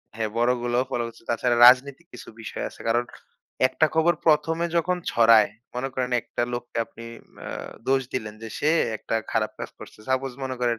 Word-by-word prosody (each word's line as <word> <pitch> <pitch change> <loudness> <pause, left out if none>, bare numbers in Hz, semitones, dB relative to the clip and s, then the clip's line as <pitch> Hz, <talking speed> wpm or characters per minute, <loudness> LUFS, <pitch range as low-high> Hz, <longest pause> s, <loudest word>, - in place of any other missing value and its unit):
হ্যাঁ 110 -1 -2
বড়গুলো 120 0 +1
ফলো 120 - -1
করছে। 115 - -13
তাছাড়া 120 +1 +1
রাজনৈতিক 135 +6 +4
কিছু - - -10
বিষয় 110 - -5
আছে। - - -14
কারণ 120 +2 +2 0.6
একটা 130 +4 +2
খবর 160 +2 +4
১ম 155 +1 +3
এ - - +2
যখন 180 +2 +1
ছড়ায়, 115 -3 +5 0.2
মনে 125 +2 -2
করেন 125 -1 -2
একটা 120 - -4
লোককে 120 -1 -5
আপনি 115 0 -12 0.4
অ্যা - - -7 0.4
দোষ 135 0 +3
দিলেন 110 -4 -4
যে 115 - -6
সে 150 - +2 0.3
একটা 110 - -5 0.2
খারাপ 110 -1 0
কাজ - - -6
করছে। - - -12
সাপোজ 130 0 0
মনে 130 -1 -4
করেন 120 -2 +1
125 Hz, 185 wpm, -25 LUFS, 115-135 Hz, 0.6 s, ছড়ায়